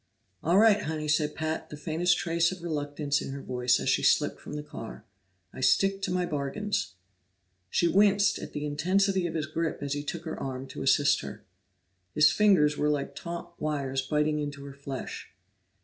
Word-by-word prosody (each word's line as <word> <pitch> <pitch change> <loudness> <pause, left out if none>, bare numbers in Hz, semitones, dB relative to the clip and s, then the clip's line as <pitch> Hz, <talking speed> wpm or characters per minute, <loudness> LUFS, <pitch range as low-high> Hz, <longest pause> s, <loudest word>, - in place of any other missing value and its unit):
"All 170 +4 +3
right, 210 -1 +6
Honey," 155 -2 -3
said 150 0 +1
Pat 160 0 -3
the 150 - -8
faintest 170 +3 +1
trace 170 0 +1
of 185 -2 -8
reluctance 145 -2 -1
in - - -5
her 140 - -6
voice 125 0 +1
as - - -4
she - - +3
slipped - - +2
from - - -9
the 150 0 -4
car. 115 -6 -9 0.5
"I - - -8
stick 195 +10 +3
to 195 - -2
my 180 0 +1
bargains." 155 - -2 0.7
She 170 - +2
winced 200 +2 +4
at - - -8
the 150 0 -3
intensity 185 +5 +1
of 165 - -6
his 155 -2 -1
grip 160 +1 -2
as 140 0 -2
he 145 0 -3
took 170 +3 -5
her 160 - -5
arm 130 0 -4
to - - -7
assist 140 +1 +3
her. 70 -1 -9 0.7
His 150 - +6
fingers 170 -9 +4
were 150 - +1
like 145 -2 -1
taunt 170 0 -6
wires 140 -3 -1
biting 150 +2 0
into 145 -1 -5
her 140 - -8
flesh. 140 -1 -7
150 Hz, 190 wpm, -28 LUFS, 145-175 Hz, 0.7 s, right